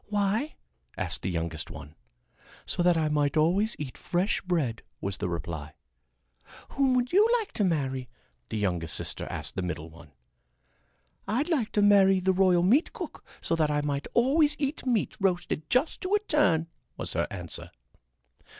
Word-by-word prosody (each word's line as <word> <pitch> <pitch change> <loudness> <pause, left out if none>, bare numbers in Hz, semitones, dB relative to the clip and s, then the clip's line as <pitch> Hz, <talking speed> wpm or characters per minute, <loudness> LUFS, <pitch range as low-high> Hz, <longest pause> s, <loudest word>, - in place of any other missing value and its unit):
"Why?" 210 +7 0 0.4
asked - - -1
the 95 - -2
youngest 85 -2 -3
one. 75 - -10 0.7
"So 180 - -2
that 175 -1 +4
I 155 -1 +1
might 150 0 +1
always 190 +9 +2
eat 140 -4 -7
fresh 180 +4 0
bread," 150 -11 -1 0.2
was 100 -1 -3
the - - -2
reply. 80 -3 -5 0.9
"Whom 270 -2 +2
would 250 +3 0
you 420 +4 +6
like 435 - -6
to 210 - -1
marry?" 135 -8 -1 0.4
the 110 - -3
youngest 90 -6 -1
sister - - -3
asked - - -5
the - - -1
middle 85 -3 -4
one. 80 -2 -15 1.2
"I'd 265 +10 0
like 270 -10 0
to 205 - +3
marry 195 -2 +6
the 190 +1 +2
royal 180 -2 +4
meat 250 - +3
cook - - -7 0.2
so 165 - 0
that 155 -2 +2
I 150 0 +1
might 145 -1 -2
always 290 +5 +4
eat 280 -1 -3
meat 235 -5 +1
roasted 175 -5 -1
just 255 +6 +1
to 380 +3 +1
a - - +3
turn," 295 - +2 0.3
was - - -3
her - - 0
answer. - - -5
175 Hz, 170 wpm, -28 LUFS, -, 1.2 s, you